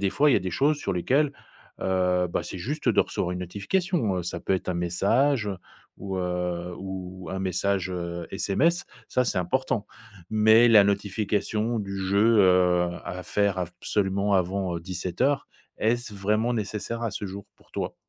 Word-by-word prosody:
des 95 - +2
fois 145 +3 +4
il - - +5
y - - +5
a - - +4
des 95 - -4
choses 145 - +2
sur 100 -9 -3
lesquelles, 135 - +2 0.5
heu, 90 -1 +1
bah - - -1
c'est - - -5
juste 145 - -3
de - - +5
recevoir 90 - -1
une 90 - -4
notification, 105 - -1
heu, - - -2
ça 85 - -4
peut - - -1
être 90 - -4
un 90 - 0
message, 110 +9 +1
heu, 95 - -3 0.4
ou, 95 -1 -4
heu, 90 -1 -2
ou 95 -2 -7
un 95 - -3
message, 95 0 0
heu, 85 -1 -4
SMS. 155 - +1 0.2
Ça 125 - +1
c'est 115 - 0
important 105 +4 -1 0.4
mais 110 +2 +6
la 105 -3 +7
notification 105 +3 0
du 100 -1 -4
jeu, 100 +4 +3
heu, 90 -2 +4 0.2
à 90 +1 -5
faire 100 +4 +1
absolument 95 +3 -1
avant, 95 -1 0
heu, 85 - -5
17:00 90 0 -5
heures, 140 0 +2 0.3
est-ce 115 0 0
vraiment 105 +4 +1
nécessaire 110 +1 -3
à 115 - -1
ce 105 - -5
jour 100 +1 -8
pour - - -26
toi? - - -3
100 Hz, 180 wpm, -26 LUFS, 90-110 Hz, 0.5 s, la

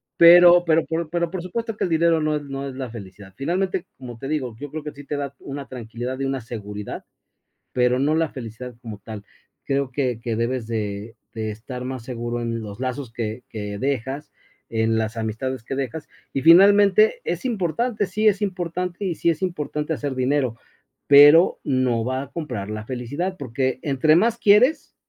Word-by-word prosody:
pero 175 +1 +8
pero 160 0 +3
por 165 -1 -3
pero, 170 0 -1
por 185 0 -4
supuesto, 225 +5 -4
que - - -2
el 180 - 0
dinero 165 0 +3
no 155 0 +1
es 145 - -7
no 140 0 -5
es 130 - -9
la 130 -2 -5
felicidad, 100 -3 -11
finalmente, 185 +5 -1
como 120 -3 -9
te 135 +4 -6
digo, 130 -7 -2
yo 145 +1 -8
creo 155 -1 -5
que 150 - -5
sí 145 0 -11
te 145 +1 -4
da 140 -1 -4
una 140 0 -7
tranquilidad 120 +1 -6
de 135 - -2
una 135 0 -1
seguridad, 105 -3 -7 0.7
pero 125 0 +2
no 145 +3 +2
la 165 -1 +1
felicidad 125 -1 -8
como 110 -4 -7
tal. 105 -2 -8 0.4
Creo 135 -1 -1
que 125 -4 -1
que 115 -2 -3
debes 115 0 -1
de 110 0 -4 0.2
de 110 -1 -3
estar 125 +4 -7
más 130 -2 -5
seguro 120 -1 -4
en 115 0 -2
los 105 -1 -8
lazos 130 0 -4
que 115 +1 -4
que 105 -3 -5
dejas 135 +3 -3 0.4
en 110 0 +1
las 110 +1 -2
amistades 115 +3 -3
que 135 - -4
dejas 140 +3 -4 0.2
y 135 - -1
finalmente, 205 - +6
es - - -3
importante, 215 - -1
sí 215 +4 -1
es 205 -1 +4
importante, 180 -1 -3
y 175 -3 -1
sí 170 - 0
es 165 +3 -3
importante 150 -3 -2
hacer 145 -3 -3
dinero, 130 -2 0 0.5
pero 145 +4 +7
no 130 -4 +1
va 130 +1 -1
a 140 - -10
comprar 105 -11 -5
la 110 0 -5
felicidad 145 +10 -3
porque 130 0 -2
entre 150 +2 +3
más 230 +6 +2
quieres 235 +9 +4
135 Hz, 190 wpm, -23 LUFS, 115-165 Hz, 0.7 s, pero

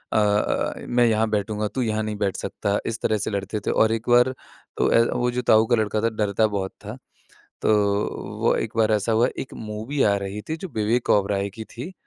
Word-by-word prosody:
अ - - +4
अ, 105 0 +1
मैं 120 0 +3
यहाँ 110 -1 +2
बैठूँगा 105 0 -1
तू 130 - -3
यहाँ 110 -2 0
नहीं 105 0 -3
बैठ 100 -2 -1
सकता। 100 0 -2
इस 115 0 -3
तरह 110 - +1
से 105 - -3
लड़ते 100 +2 -3
थे - - +3
और 110 0 +3
एक 115 +2 -4
बार 125 +2 +5 0.4
तो - - +2
ए, 115 - +6
वो 125 0 0
जो 125 +1 -2
ताऊ 110 -2 +4
का 120 - +4
लड़का 110 -1 0
था 115 - +2
डरता 110 0 +1
बहुत 100 -2 -3
था। 110 +5 -6 0.7
तो - - +2 0.7
वो - - +3
एक - - -3
बार 110 -1 +3
ऐसा 105 +2 +1
हुआ 115 +2 +4
एक 130 - -5
मूवी 110 +6 -3
आ 100 - +4
रही 100 +1 -5
थी 160 - -2
जो 185 +3 -7
विवेक 110 +3 0
ओबेरॉय 100 0 +2
की 110 +3 -8
थी। 130 +12 -8
110 Hz, 225 wpm, -23 LUFS, 105-115 Hz, 0.7 s, ए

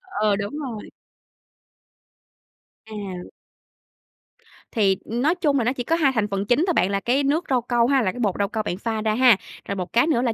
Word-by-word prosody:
Ờ, 290 - 0
đúng 205 +5 -4
rồi. 245 -8 -6 2.0
À. 195 -5 -7 1.4
Thì 195 -5 +2
nói 255 +9 0
chung 295 -6 +1
là 235 - +1
nó 250 - +1
chỉ 250 - -4
có 325 +7 +1
2 295 -5 +3
thành 215 -2 +1
phần 195 0 -2
chính 250 +9 +2
thôi 355 - +2
bạn, 190 - +2
là 200 - 0
cái 255 +7 +1
nước 295 +5 +1
rau 255 -2 +2
câu 240 0 +1
ha, 270 0 +3
là 190 -5 0
cái 250 - -10
bột 205 -6 0
rau 200 - +2
câu 220 0 -2
bạn 180 - -3
pha 220 +1 -3
ra 215 0 0
ha, 245 -3 +6 0.3
rồi 200 - -3
một 185 -2 -5
cái 240 +6 +4
nữa 260 -7 +2
là 240 -2 0
235 Hz, 215 wpm, -23 LUFS, 205-270 Hz, 2.0 s, ha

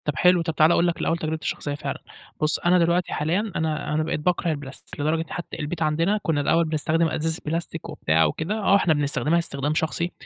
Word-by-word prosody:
طب 150 - 0
حلو، 180 +3 +4
طب 165 -2 -3
تعالَ 155 +3 +5
اقول 170 - +3
لك 170 - -1
الأول 165 - +1
تجربتي 160 -1 -3
الشخصية 145 -1 -3
فعلًا. - - -5 0.4
بُص، 155 0 +2
أنا 180 +1 +3
دلوقتي 170 +1 +1
حاليًا 185 +8 -1
أنا 155 -2 -1
أنا 155 +1 +1
بقيت 160 0 -2
باكرَه 175 +1 0
البلاستيك، 145 -3 -8
لدرجة 160 +3 0
حتى 175 - -6
البيت 155 +2 -4
عندنا 165 +7 +1
كنا 150 -3 +1
الأول 165 +3 +2
بنستخدم 160 +1 +1
أزايز 160 +1 -2
بلاستيك 165 +2 -3
وبتاع 80 +1 +2
وكده. 160 - -2
آه، 200 -1 +4
إحنا 175 -5 +3
بنستخدمها 145 +2 +1
استخدام 145 -3 -2
شخصي 160 +3 -1
160 Hz, 205 wpm, -24 LUFS, 150-170 Hz, 0.4 s, تعالَ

